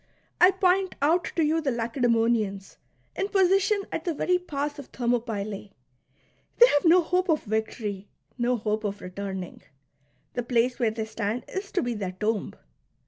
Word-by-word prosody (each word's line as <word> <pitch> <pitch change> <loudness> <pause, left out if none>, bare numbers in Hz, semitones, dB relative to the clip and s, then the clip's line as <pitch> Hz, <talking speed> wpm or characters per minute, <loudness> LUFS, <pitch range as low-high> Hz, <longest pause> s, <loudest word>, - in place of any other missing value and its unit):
I 360 +2 +8
point 380 0 +2
out 330 +5 +2
to 325 - +3
you 320 +2 +1
the 295 - 0
Lacedaemonians 230 -4 0 0.4
in 390 - -1
position 390 +1 +3
at 325 - -3
the 340 -3 -2
very 360 +4 +1
pass 290 -3 -4
of 280 - -9
Thermopylae! 220 -5 -2 0.8
They 485 - +9
have 290 +4 +2
no 345 +2 +6
hope 360 +3 0
of 310 -2 +2
victory, 210 -2 -3 0.3
no 245 0 +1
hope 215 0 -2
of 205 -1 -2
retui 195 +1 -6
ning. 180 -2 -8 0.7
The 245 - -1
place 245 +1 +1
where 235 -3 +3
they 220 0 -4
stand 220 +2 -3
is 395 +1 -5
to 375 - +1
be 245 -1 -1
their 195 -4 -4
tomb. 210 +2 -2
245 Hz, 165 wpm, -26 LUFS, 215-340 Hz, 0.8 s, They